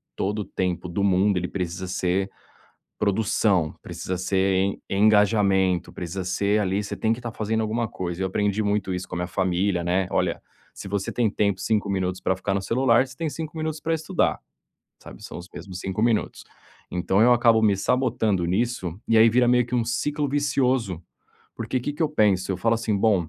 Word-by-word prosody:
todo 105 +2 -2
o 105 - -3
tempo 90 -1 -2
do 100 +3 -1
mundo 95 0 +3
ele 90 - -1
precisa 90 0 -4
ser 95 +1 -1 0.7
produção, 100 -5 +1
precisa 85 +1 -5
ser 95 +1 +1
en 95 +1 0
engajamento, 100 -3 +3
precisa 90 +2 -5
ser 100 +3 +1
ali 100 0 0
você 100 - -5
tem 110 0 +1
que 115 - -2
estar 120 -2 -6
fazendo 110 0 -1
alguma 110 +1 -1
coisa. 90 -1 -4
Eu - - +1
aprendi 105 +2 0
muito 100 -2 0
isso 90 0 -5
com - - -5
a - - -2
minha 90 - -2
família, 95 0 0
né: 90 +1 +1
"Olha, - - 0 0.3
se - - -9
você 100 0 -2
tem 120 -3 +1
tempo 100 -3 0
5 105 -1 0
minutos 95 -1 -1
pra 95 0 0
ficar 95 +1 -2
no 100 - -1
celular, 120 +3 +3
você - - -14
tem 165 -1 -2
5 160 +3 -6
minutos 155 -1 -3
pra 165 - 0
estudar". 160 +3 0 0.7
Sabe. - - -12
São - - -8
os 90 - -9
mesmos 95 -2 -8
5 95 +2 -3
minutos. 115 -2 0 0.5
Então 95 +3 +1
eu 120 +1 +6
acabo 115 -2 +4
me 105 -2 +4
sabotando 110 -6 +1
nisso, 95 -2 -1
e 115 - +4
aí, 115 +1 +7
vira 120 +2 +3
meio 125 0 +4
que 120 - -3
um 120 - +2
ciclo 145 +5 -1
vicioso. 130 - 0 0.6
Porque 130 - -2
que 145 +4 -3
que 160 - -3
eu 155 - +2
penso? 100 -10 +2
Eu - - -2
falo 115 +5 +1
assim: 110 -3 -1
"Bom, 100 -6 +2
100 Hz, 200 wpm, -24 LUFS, 95-115 Hz, 0.7 s, aí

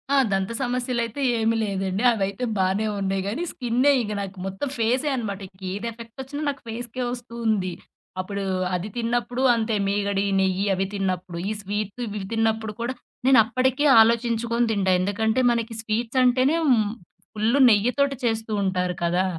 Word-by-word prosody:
ఆ! - - +5
దంత 195 +2 0
సమస్యలైతే 245 0 -2 0.2
ఏమీ 225 +1 +2
లేదండి. 195 0 -2
అవైతే 200 +2 -2
బానే 190 +3 +1
ఉన్నాయి 195 0 -1
గానీ, 225 +11 -2
స్కిన్నే 250 +3 +2
ఇంగ 210 -2 -3
నాకు 195 0 -7
మొత్తం 195 +8 -3
ఫేసే 250 +6 +1
అనమాట. 210 -6 -3
ఇంకేది 190 +3 -6
ఎఫెక్ట్ 230 +1 -12
ఒచ్చినా 285 +3 -6
నాకు 280 - -5
ఫేస్‌కే 240 +2 -5
ఒస్తూ 245 -1 -9
ఉంది. 190 -5 +1 0.5
అప్పుడు 200 +2 -3 0.3
అది 180 +4 -3
తిన్నప్పుడు 240 +1 -1
అంతే 225 -1 0
మీగడి, 200 0 0
నెయ్యి 190 +1 +1
అవి 190 +1 0
తిన్నప్పుడు. 185 -3 -2
ఈ - - -1
స్వీట్ 205 +3 -4
ఇవి 210 -2 -5
తిన్నప్పుడు 220 -1 0
కూడా 240 +2 -1 0.3
నేను 265 -3 +7
అప్పడికే 260 +5 +1 0.2
ఆలోచించుకొని 235 +1 +2
తింటా. 195 -3 +1
ఎందుకంటే, 220 +5 0
మనకి 230 -1 -2
స్వీట్స్ 225 +3 -1
అంటేనే 255 +4 +3
హ్మ్ 225 -7 +3 0.4
ఫుల్లు 220 +6 +1
నెయ్యితోటి 250 +6 +2
చేస్తూ 225 -1 -1
ఉంటారు 180 -2 0
కదా! 175 +2 +2
220 Hz, 150 wpm, -24 LUFS, 195-240 Hz, 0.5 s, నేను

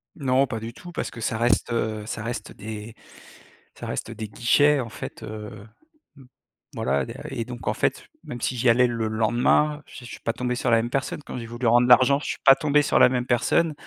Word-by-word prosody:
Non, 135 -3 +2
pas 115 -2 -4
du 115 +1 -7
tout, 175 +5 -11
parce - - -4
que 115 - -10
ça 110 - -1
reste, 120 0 +1
heu, 110 -2 -2
ça 105 -1 -5
reste 115 -2 -5
des 110 +1 -8 0.8
ça - - -8
reste - - -4
des 110 -1 -6
guichets, 145 +7 +3
en 115 - -6
fait, - - -8
heu 105 -1 -8 1.1
voilà, 70 +1 0
et - - -5
da - - -7 0.2
et 115 - -3
donc, 120 -1 -9
en - - +2
fait, - - -1 0.2
même 120 - -7
si 130 - -1
j'y 120 +1 +2
allais 125 +2 +5
le 115 -2 -2
lendemain, 120 +7 +1
je 125 - -11
suis 125 - -9
pas 115 - -1
tombé 125 +1 -2
sur 125 - -1
la 115 - +6
même 115 +1 -1
personne. 135 - -2
Quand - - -7
j'ai 115 - -6
voulu 120 +1 -5
rendre 120 +2 +4
l'argent, 130 +3 +6
je - - -7
suis - - -3
pas 135 - +10
tombé 150 0 +2
sur - - +2
la - - +7
même 125 -1 -1
personne 130 +6 +1
120 Hz, 230 wpm, -24 LUFS, 110-130 Hz, 1.1 s, pas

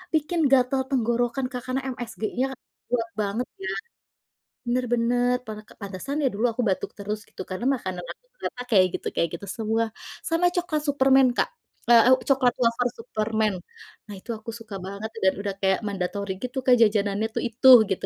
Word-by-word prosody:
bikin 320 +3 0
gatal 265 0 +4
tenggorokan, 245 0 0
Kak, 250 -1 -4
karena 260 +1 -1
msgnya 230 +1 -3 0.5
kuat 230 -2 0
banget 210 +5 -2 0.2
ya. - - -2 1.0
Bener 250 +1 +1
bener 245 +1 +2
pa 215 - -5 0.3
pantesan 205 +10 -4
ya 265 - +4
dulu 225 +4 +1
aku 245 - -2
batuk 190 - -1
terus 210 +1 -3
gitu - - -8
karena 210 +7 -3
makanan 185 -7 -5
aku - - -10
ternyata 250 - -5
kayak 190 -4 +6
gitu - - -5
kayak 170 - +1
gitu 200 - -7
semua. 225 0 0 0.4
Sama 335 +2 +2
coklat 335 -4 -1
superman 270 -2 +5
Kak, - - +2 0.4
eee, 235 +1 +7
u - - +1
coklat 260 -3 +3
wafer 235 +1 +2
superman 220 -2 -1 0.5
nah 205 - -8
itu 235 - -10
aku 225 +1 -7
suka 215 -3 -10
banget 200 +3 -5
dan 190 - +5
udah 200 -1 -3
kayak 190 0 +3
mandatory 200 +1 -3
gitu 250 +1 -4
kan 250 - +7
jajanannya 205 0 +2
tuh - - -1
itu 235 +4 -2 0.2
gitu 190 - -2
230 Hz, 175 wpm, -25 LUFS, 205-255 Hz, 1.0 s, eee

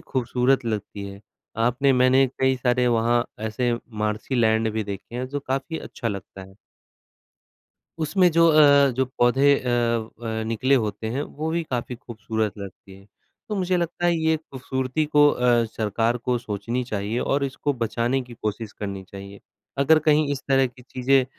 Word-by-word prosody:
खूबसूरत 130 +1 0
लगती 105 -2 -4
हैं। 100 0 -11 0.5
आपने 135 +3 +2
मैंने 130 +1 +4
कई 130 0 +3
सारे 125 0 +1
वहाँ 120 0 +2 0.2
ऐसे 120 +2 -1 0.3
मार्शी 105 +5 -2
लैंड 110 -1 +2
भी 110 -1 -2
देखे 100 +3 -8
हैं 125 +1 -3
जो 145 +2 -4
काफ़ी 135 +4 -3
अच्छा 115 - -5
लगता 100 -1 -7
है। 95 0 -14 1.4
उसमें 180 +3 +3
जो 165 0 +5
अ, 145 -3 +6
जो 130 - +2
पौधे 135 +4 +4
अ, 125 - -5 0.5
व 110 -1 -3
निकले 130 +5 +1
होते 110 -3 -1
हैं 140 - -1
वो 155 +2 -5
भी 170 +1 0
काफ़ी 125 0 -3
खूबसूरत 110 -3 -3
लगती 100 0 -10
हैं 100 - -18 0.4
तो 210 - -2
मुझे 185 -1 +1
लगता 175 0 -1
है 170 -1 +3
ये 160 0 +2
खूबसूरती 130 -1 -3
को 150 -1 +5
अ, 120 -3 +2
सरकार 115 +2 0
को 125 +1 -1
सोचनी 115 +2 -3
चाहिए 105 0 -3
और 140 0 0
इसको 140 +2 -2
बचाने 120 +4 0
की 120 -1 -12
कोशिश 110 0 -3
करनी 100 -2 -6
चाहिए। 100 +1 -11 0.4
अगर 155 +3 +5
कहीं 155 0 +4
इस 135 - -3
तरह 135 -1 +4
की 125 0 -14
चीज़ें 130 +1 +2
125 Hz, 170 wpm, -24 LUFS, 110-140 Hz, 1.4 s, अ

